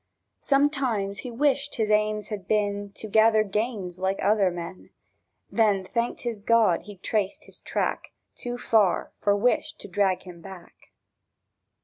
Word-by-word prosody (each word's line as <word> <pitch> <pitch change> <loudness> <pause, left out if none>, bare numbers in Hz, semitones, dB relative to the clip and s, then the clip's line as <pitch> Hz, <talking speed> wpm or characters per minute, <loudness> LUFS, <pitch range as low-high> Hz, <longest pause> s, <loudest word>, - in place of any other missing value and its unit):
Sometimes 265 -8 +1
he 250 - -6
wished 285 +3 0
his 215 -2 0
aims 210 0 +1
had 200 -4 -6
been 205 -1 0
To 220 - -6
gather 220 +1 +5
gains 205 -3 -3
like 190 +1 0
other 200 -1 +3
men; 175 +1 -8 0.6
Then 205 -4 +2
thanked 235 +5 -2
his 235 -3 -3
God 215 -4 +3
he'd 200 -2 -12
traced 205 -3 -1
his - - -12
track - - -2 0.2
Too 245 0 -5
far 215 -6 +2
for 205 0 +2
wish 235 +5 +1
to - - -10
drag 195 -1 +1
him 175 -2 -11
back. 190 -2 -13
210 Hz, 145 wpm, -26 LUFS, 195-230 Hz, 0.6 s, gather